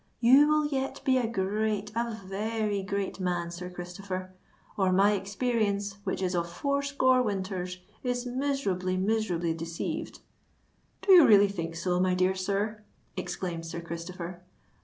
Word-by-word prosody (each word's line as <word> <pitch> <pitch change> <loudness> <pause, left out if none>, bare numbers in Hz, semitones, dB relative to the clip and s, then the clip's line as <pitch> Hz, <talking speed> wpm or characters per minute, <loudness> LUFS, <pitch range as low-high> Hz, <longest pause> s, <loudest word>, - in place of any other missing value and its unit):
"You 260 +5 +7
will 305 0 +3
yet 270 -2 -2
be 260 -2 +4
a 240 - 0
great—a 215 +2 -1
very 210 +1 -1
great 195 0 -3
man, 175 -2 -1
Sir 180 +1 -6
Christopher; 185 +1 -6 0.4
or 190 -2 +2
my 195 +3 +5
experience, 205 0 -1
which 190 0 -2
is 185 0 0
of 170 -1 -1
four 280 +10 0
score 260 -2 +3
winters, 190 -4 -3 0.2
is 245 -1 -2
miserably—miserably 195 -8 0
deceived." 165 0 -5 0.8
"Do 395 - +3
you 350 -5 +9
really 205 -2 +7
think 165 -4 -4
so, 180 +1 0
my 185 0 +2
dear 185 +1 +2
sir?" 200 +3 -2 0.3
exclaimed 175 -2 -4
Sir 165 - -5
Christopher. 170 +1 -6
195 Hz, 140 wpm, -29 LUFS, 180-225 Hz, 0.8 s, you